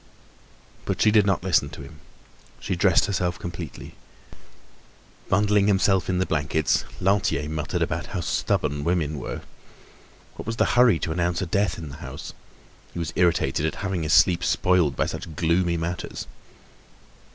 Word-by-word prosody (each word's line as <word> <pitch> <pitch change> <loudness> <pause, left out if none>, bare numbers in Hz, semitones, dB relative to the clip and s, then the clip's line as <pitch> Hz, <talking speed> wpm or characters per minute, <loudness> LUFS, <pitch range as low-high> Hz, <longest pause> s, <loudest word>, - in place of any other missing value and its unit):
But - - -2
she 105 - +4
did 105 -2 +4
not 95 -2 +1
listen 85 -6 +2
to 70 - -9
him, 75 +3 -13 0.6
she 95 - -2
dressed 90 0 +3
herself 90 -4 -1
completely. 85 -3 -7 1.4
Bundling 100 +1 +3
himself 95 -2 +2
in 90 - +1
the 95 - +1
blankets, 75 -1 0
Lantier 95 -6 +1
muttered 75 -1 -2
about - - -3
how - - -4
stubborn 70 0 -1
women 75 -3 0
were. - - -5 1.0
What - - -8
was 115 - -2
the - - +2
hurry 120 -7 +5
to 80 - -3
announce 85 +2 0
a - - -2
death 95 +1 0
in 80 -3 -7
the 70 - -9
house? - - -8 0.6
He - - -8
was 85 -2 -3
irritated 85 -4 +2
at 80 - -1
having 95 -3 -1
his 80 0 0
sleep 90 -2 +5
spoiled 90 -8 +2
by - - +1
such 80 - -6
gloomy 85 +2 +1
matters. 85 +2 -4
85 Hz, 160 wpm, -24 LUFS, 80-95 Hz, 1.4 s, hurry